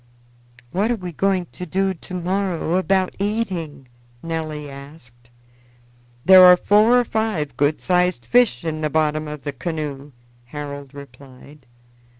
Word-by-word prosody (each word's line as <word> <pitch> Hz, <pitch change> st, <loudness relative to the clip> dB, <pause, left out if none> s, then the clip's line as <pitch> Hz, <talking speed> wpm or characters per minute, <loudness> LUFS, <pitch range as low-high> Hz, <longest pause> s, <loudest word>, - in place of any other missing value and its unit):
"What 205 Hz, +5 st, 0 dB
are 240 Hz, -, +1 dB
we 180 Hz, -5 st, -7 dB
going 190 Hz, +2 st, 0 dB
to 180 Hz, -, -8 dB
do 190 Hz, +3 st, 0 dB
to 180 Hz, +1 st, -11 dB
morrow 180 Hz, -1 st, -1 dB
about 190 Hz, 0 st, 0 dB
eating?" 185 Hz, -, -3 dB, 0.4 s
Nelly 155 Hz, -2 st, -4 dB
asked. 135 Hz, -4 st, -14 dB, 1.0 s
"There 185 Hz, 0 st, +9 dB
are 180 Hz, 0 st, +9 dB
four 215 Hz, +6 st, +4 dB
or 245 Hz, -, 0 dB
five 210 Hz, -, -2 dB
good 145 Hz, +3 st, +1 dB
sized 180 Hz, -8 st, 0 dB
fish 215 Hz, -, +2 dB
in 155 Hz, -1 st, -3 dB
the 155 Hz, -, -1 dB
bottom 155 Hz, 0 st, 0 dB
of 150 Hz, -2 st, -8 dB
the 145 Hz, -, -4 dB
canoe," 145 Hz, -1 st, -5 dB, 0.3 s
Harold 140 Hz, +1 st, -8 dB
replied. 140 Hz, 0 st, -14 dB
160 Hz, 140 wpm, -21 LUFS, 145-190 Hz, 1.0 s, There